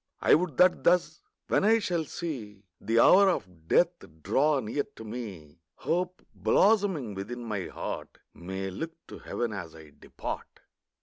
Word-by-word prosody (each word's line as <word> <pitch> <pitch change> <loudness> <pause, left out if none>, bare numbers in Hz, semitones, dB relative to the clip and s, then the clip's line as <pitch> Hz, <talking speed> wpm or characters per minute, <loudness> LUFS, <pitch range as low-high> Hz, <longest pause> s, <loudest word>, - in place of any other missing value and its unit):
I - - +4
would 165 -4 +2
that 180 0 +4
thus, 180 - +2 0.3
when - - +2
I 220 +2 +5
shall 175 -7 -1
see 125 - -6 0.2
The 115 +1 +1
hour 195 +9 +7
of 90 - -4
death 175 - +4 0.3
draw 140 +8 +2
near 120 +4 -2
to - - -9
me, 100 -10 -8 0.2
Hope, 180 +2 -2
blossoming 190 - +2
within 115 +6 -6
my 105 -5 -3
heart, - - -6 0.2
May 95 +2 -5
look 165 - -5 0.2
to - - -9
heaven 120 -3 -3
as 90 -6 -7
I 80 -2 -13
depart. - - -8
120 Hz, 150 wpm, -28 LUFS, -, 0.3 s, hour